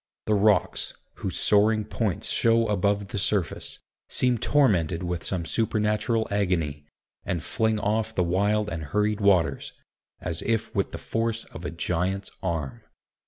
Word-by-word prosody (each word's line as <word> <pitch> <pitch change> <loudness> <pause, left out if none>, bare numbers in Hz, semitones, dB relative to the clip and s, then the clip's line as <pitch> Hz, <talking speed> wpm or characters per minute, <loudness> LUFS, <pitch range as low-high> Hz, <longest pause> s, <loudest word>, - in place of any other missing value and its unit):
The 110 - +2
rocks, 105 0 +2 0.2
whose - - -3
soaring 105 +1 +3
points 105 -3 -2
show 115 0 +3
above 100 0 +1
the 100 - -2
surface, 95 -3 -1 0.3
seem 125 -2 +2
tormented 95 - +2
with 90 -1 -3
some 90 -3 -2
supernatural 110 +2 +1
agony, 85 -8 -1 0.4
and 85 -3 -2
fling 110 +4 0
off 110 +2 -1
the 90 - +2
wild 100 +4 +1
and 85 -4 -4
hurried 105 +7 0
waters, 95 -5 +2 0.5
as 85 0 -3
if 115 -1 -1
with 100 -2 0
the - - -5
force 115 0 -2
of - - -8
a - - -1
giant's 90 +4 -2
arm. 80 -7 -3
100 Hz, 145 wpm, -26 LUFS, 90-110 Hz, 0.5 s, soaring